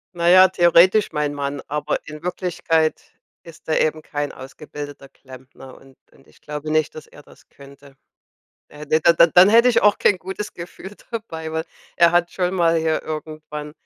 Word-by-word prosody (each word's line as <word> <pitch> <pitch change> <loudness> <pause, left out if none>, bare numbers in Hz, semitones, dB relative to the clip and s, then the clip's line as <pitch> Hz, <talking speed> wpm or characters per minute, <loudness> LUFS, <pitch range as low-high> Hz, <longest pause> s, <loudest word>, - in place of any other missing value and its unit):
Na 170 0 -1
ja, 185 +1 +7
theoretisch 185 +3 +3
mein 150 -2 -2
Mann, 140 -1 -4
aber 150 0 -2
in 155 +1 -10
Wirklichkeit 165 -3 -1 0.4
ist 165 -1 -16
er 155 - +1
eben 155 0 0
kein 145 -2 -5
ausgebildeter 145 +1 -10
Klempner, 130 0 -15
und 135 -1 -20 0.2
und 135 - -24
ich - - -25
glaube 150 +1 -6
nicht, 155 -1 0
dass 155 - -10
er 145 - -17
das - - -21
könnte. 140 0 -17 0.7
Da 150 - -16
hätte 150 +1 0
d 170 +2 +5
da 170 - +7
dann 180 +4 +6
hätte 235 +3 +5
ich 245 - +2
auch 210 0 +3
kein 195 - +2
gutes 190 +3 -7
Gefühl 180 +3 -10 0.2
dabei, 160 -8 -6
weil 160 0 -3 0.3
Er 170 0 +5
hat 175 0 +1
schon 180 0 -2
mal 165 -2 +2
hier 160 -1 -1
irgendwann 155 -1 -7
160 Hz, 180 wpm, -20 LUFS, 150-175 Hz, 0.7 s, ja